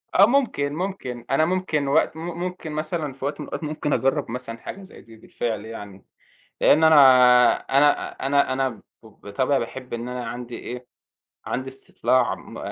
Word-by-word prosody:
آه 195 - +8
ممكن، 220 - 0
ممكن، 155 -10 -5
أنا 155 +3 +3
ممكن 170 -5 -1
وقت 160 +2 +2
م - - -7 0.2
ممكن 180 -3 -5
مثلًا 155 -2 -3
في 135 0 -7
وقت 145 +2 -3
من - - -7
الأوقات، - - -6
ممكن 150 -1 -2
أجرَّب 135 -3 0
مثلًا 125 -2 -6
حاجة 195 +11 -9
زي 190 - -14
دي 115 -1 -16
بالفعل 110 -1 -4
يعني، 105 -4 -10 0.6
لإن 160 +2 +5
أنا 160 -1 +6 0.6
أنا 145 +2 +2 0.2
أنا 140 -1 +2
أنا 135 0 0
ب 115 -5 -11 0.2
بطبعي 110 +5 -2
باحب 125 +1 -6
إن 120 +1 -5
أنا 125 -1 -5
عندي 120 +1 -7
إيه، 125 0 -8 0.6
عندي 130 +1 -3
استطلاع 130 -1 0
م - - -12
135 Hz, 170 wpm, -23 LUFS, 120-155 Hz, 0.6 s, آه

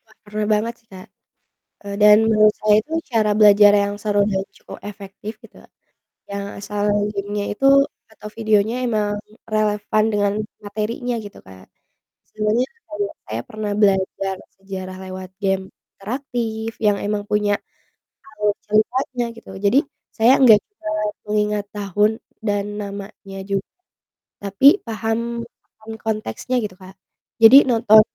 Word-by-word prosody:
Wah, 220 - -24
parah 210 0 -3
banget 220 +3 0
sih 225 - -40
Kak, 185 0 -11 0.8
eee, 200 0 -5
dan 210 0 +8
menurut 215 -1 +5
saya 210 -1 +4
itu 310 - -14 0.2
cara 220 -3 +2
belajar 205 -1 +7
yang 200 0 -2
seru 205 -1 +1
dan 190 -1 0
cukup - - -11
efektif 205 +1 -8
gitu, - - -16 0.7
yang 200 0 -4
asal 205 0 -3 0.3
gamenya 205 0 -3
itu 270 - +1 0.5
atau 210 -1 -10
videonya 220 0 +2
emang 210 -3 0 0.3
relevan 215 0 +1
dengan 205 -1 +1 0.3
materinya 220 +4 -3
gitu 205 - -11
Kak, 95 0 -15 0.6
senengnya 215 +4 0 0.2
kayak 205 -1 -3 0.2
saya 110 +1 -3
pernah 215 -1 -4
belajar 195 -1 +1 0.2
sejarah 185 -1 -7
lewat 185 0 -8
game 195 -1 0 0.3
interaktif 225 0 -4
yang 205 -2 +3
emang 205 0 -2
punya, 210 -1 +2 0.8
alur 210 -1 +1
ceritanya 245 +4 0
gitu. 230 - -13
Jadi 200 +6 +3 0.3
saya 230 +3 +4
gak 225 -4 +9
bisa 410 - -11 0.4
mengingat 210 -1 0
tahun 205 +2 +1 0.3
dan 205 -2 0
namanya 200 -1 -8
juga, 195 0 -2 0.8
tapi 200 +7 +3 0.2
paham 225 0 -2 0.6
paham 220 0 -11
konteksnya 220 - -2
gitu 210 -5 -5
Kak, 185 0 -14 0.4
jadi 230 +5 +9
nonton, 225 -2 +6
210 Hz, 130 wpm, -21 LUFS, 200-220 Hz, 0.8 s, gak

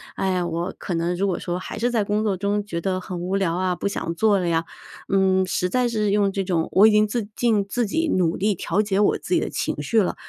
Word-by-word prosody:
哎 190 -1 0
呀， 180 -1 0
我 170 +2 -3
可 180 - -3
能 170 +2 -1
如 195 +3 0
果 180 -3 -1
说 175 0 -3
还 185 - -7
是 240 +3 0
在 225 -3 +1
工 210 +2 0
作 205 -3 +1
中 200 +2 -1
觉 170 -4 -4
得 185 0 -1
很 180 -1 -6
无 185 +2 -2
聊 190 -4 +1
啊， 180 0 0
不 175 - -2
想 170 -4 -3
做 205 +2 +3
了 180 - -1
呀， 165 0 +1 0.5
嗯， 190 -1 +3
实 180 0 -1
在 250 +4 +1
是 215 -3 0
用 200 -1 +2
这 195 0 -2
种 175 -3 0
我 205 +3 +6
已 - - +5
经 210 0 +4
自 225 +1 -2
尽 225 -4 +2
自 240 +2 0
己 320 +10 -1
努 175 -2 +1
力 205 0 +1
调 210 - 0
节 205 -1 0
我 210 - +2
自 - - -1
己 - - +3
的 - - -3
情 - - -2
绪 225 -2 +2
了， 185 - -1
195 Hz, 290 characters per minute, -23 LUFS, 180-210 Hz, 0.5 s, 我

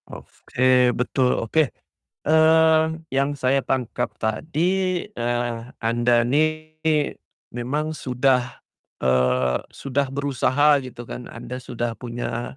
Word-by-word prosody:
Oke 125 -1 +1
betul 125 +1 +1
oke, 140 +5 +1 0.6
mmm, 160 0 +4
yang 140 +1 +1
saya 135 +1 +2
tangkap 125 -2 -2
tadi, 175 - -1
eee, 120 0 -2 0.2
Anda 120 +1 +2
nih 155 +4 0 0.7
memang 145 +6 -2
sudah, 125 -3 0 0.4
eee, 65 0 +2
sudah 140 +1 -1
berusaha 140 +1 +2
gitu 120 -1 -9
kan, 120 +1 -8
anda 120 +2 -7
sudah 120 -1 -3
punya 120 0 -5
130 Hz, 100 wpm, -23 LUFS, 120-155 Hz, 0.7 s, mmm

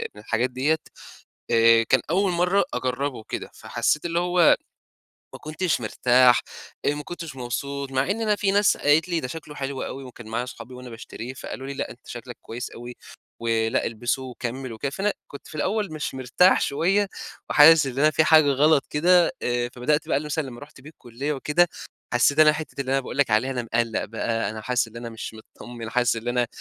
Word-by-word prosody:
من 105 - -11
الحاجات 115 +4 0
ديّة، 135 +5 +1 0.7
آآ، 115 0 +6
كان 130 +2 +3
أول 190 +1 +2
مرة 180 +3 +2
أجرّبه 130 +2 -2
وكده، 110 - -6
فحسيت 130 +7 -1
اللي 170 0 0
هو 175 -1 +4 0.8
ما - - -9
كنتش 155 -1 -1
مرتاح، 125 +3 +4 0.4
آآ، - - +4
ما 150 - -6
كنتش 165 -3 -7
مبسوط، 140 +2 -4
مع 135 +8 +1
إن 225 - -2
أنا 215 -2 +2
في 200 -1 0
ناس 205 0 +3
قالت 150 +4 +3
لي: 170 -2 0
"ده 130 - -4
شكله 150 +1 -8
حلو 135 -1 -4
أوي." 135 - -6
وكان 125 -3 -11
معايا 115 +2 -2
صحابي 125 0 -10
وأنا 125 0 -9
باشتريه 115 +1 -8
فقالوا 135 0 -7
لي: 140 - -4
"لأ، - - -4
أنت 125 - -16
شكلك 120 0 -8
كويس 120 +2 -7
أوي 120 +1 -9 0.4
ولأ، 115 -1 0
إلبسه 120 +3 -2
وكمّل 125 0 -5
وكده." 125 +5 -3
فأنا 200 +7 -1
كنت 140 - -11
في - - -11
الأول 200 +2 -1
مش 155 -3 -4
مرتاح 130 +9 +3
شوية 195 +8 +1 0.4
وحاسس 155 0 +7
إن 135 0 -4
أنا 155 +1 +5
في 160 - +3
حاجة 155 -1 +6
غلط 145 +1 +3
كده، 175 +3 +4
آآ، 120 0 0
فبدأت 145 +5 0
بقى - - +1
مثلًا 150 +1 -2
لما 120 -2 -9
رُحت 145 -2 -13
بيه 145 - -11
الكُلية 140 0 -5
وكده 150 +5 +2 0.5
حسيت 140 +4 +3
إن 155 - +8
أنا 155 - +6
حتّة 150 -2 -5
اللي 130 - -4
أنا 135 - +3
باقول 135 - -7
لك 140 -5 +3
عليها، 115 +5 +2
أنا 125 -2 -2
مقّلّق 115 -1 0
بقى، 115 -1 -2
أنا 110 0 -6
حاسس 125 0 0
إن 110 - -16
أنا 115 0 -6
مش 115 0 -7 0.2
مطّمن، 120 -2 -8
حاسس 125 0 +2
إن 115 +1 -6
أنا 120 0 +1
135 Hz, 205 wpm, -24 LUFS, 120-155 Hz, 0.8 s, إن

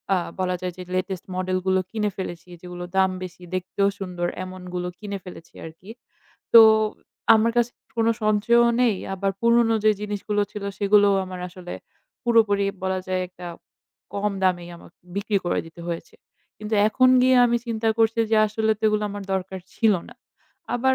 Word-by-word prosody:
আ - - +2 0.2
বলা 180 -1 0
যায় 180 -1 -3
যে, - - -7
latest 185 0 -3
model 185 0 -1
গুলো 190 0 +3
কিনে 210 -2 -1
ফেলেছি, 175 -2 -6
যেগুলো 180 0 -8
দাম 190 0 +4
বেশি, 180 0 -9
দেখতেও 195 +2 0
সুন্দর, 180 -2 -3 0.2
এমনগুলো 180 -1 -6
কিনে 200 -2 -5
ফেলেছি 175 -2 -12
আরকি। 165 +5 -12 0.7
তো 230 - +12 0.7
আমার 225 +1 +3
কাছে 240 0 +2 0.2
কোনো 230 0 +3
সঞ্চয়ও 230 +3 +4
নেই, 225 -5 +3 0.2
আবার 195 +1 -1
পুরনো 235 -1 +4
যেই 215 - +5
জিনিসগুলো 205 0 -2
ছিল 205 -2 -6
সেগুলো 205 0 +4 0.2
আমার 185 -1 -8
আসলে 180 0 -10 0.5
পুরোপুরি 215 -4 +3 0.2
বলা 190 0 0
যায় 185 0 -1
একটা 180 -1 -11 0.7
কম 205 0 -1
দামেই 175 -2 +1
আমাকে - - -17 0.2
বিক্রি 200 0 0
করে 175 - 0
দিতে 165 +1 -13
হয়েছে। 170 -1 -6 0.4
কিন্তু 215 +1 -3
এখন 255 +4 +4
গিয়ে 255 0 +5
আমি 235 0 +2
চিন্তা 225 -1 -1
করছি 225 0 +2
যে, 220 - +4
আসলে 220 +1 0
তো 220 - -5
ওগুলো 210 0 0
আমার 205 0 -6
দরকার 190 0 -3 0.2
ছিল 220 -2 +3 0.2
না। - - -13 0.6
আবার 260 +2 +2
200 Hz, 165 wpm, -24 LUFS, 185-220 Hz, 0.7 s, তো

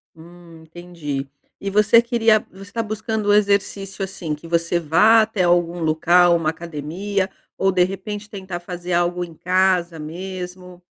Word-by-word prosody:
Hum, 170 0 -15
entendi 160 -4 -6 0.3
e 200 - -3
você 210 +3 +5
queria 230 -3 +2
você 195 +1 -12
tá 230 +1 -2
buscando 220 0 -3
o - - +6
exercício, 200 -1 0
assim, 180 -4 -4
que 150 +3 -13
você 170 +1 +1
vá 210 +8 +5
até 215 -3 0
algum 175 0 +2
local 170 +2 +4
ou - - +4
uma 155 -2 0
academia 170 +5 -3 0.3
ou, 195 0 +2
de 180 -1 +3
repente, 200 +3 -5
tentar 190 -4 -6
fazer 175 0 -7
algo 175 +1 +1
em 170 - -9
casa 180 -1 +1
mesmo? 180 +2 -7
180 Hz, 160 wpm, -21 LUFS, 170-200 Hz, 0.3 s, o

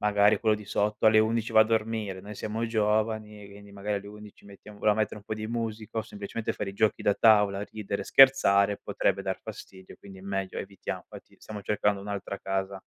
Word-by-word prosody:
magari 105 0 +3
quello 110 -2 +2
di 105 0 -8
sotto 105 +1 0
alle 110 0 +6
11:00 115 +1 0
va 110 - +7
a - - +7
dormire, 110 -3 -2
noi 105 +2 -9
siamo 110 +3 -3
giovani 110 -1 -1
e 100 - -14
quindi 100 0 -14
magari 100 +1 -3
alle 100 - -7
11:00 105 0 -13
mettiamo 100 +1 -14
vogliamo 105 - +3
mettere 110 0 -1
un 105 - -11
po' - - -6
di 110 0 -5
musica, 115 -1 -4
o - - 0
semplicemente 105 +1 -5
fare 100 - -4
i 95 - -14
giochi 110 +1 +1
da 100 - +3
tavola, 105 -3 +4
ridere, 105 -2 -5
scherzare, 105 -7 +5
potrebbe - - 0
dar - - -3
fastidio. 95 -1 -11
Quindi 95 -1 -13
è - - -12
meglio 95 -1 -3
evitiam 95 -1 -6
fatti - - -13
stiamo 105 -2 -8
cercando 105 0 0
un'altra 100 -1 -5
casa 95 0 -3
105 Hz, 210 wpm, -27 LUFS, 100-110 Hz, -, va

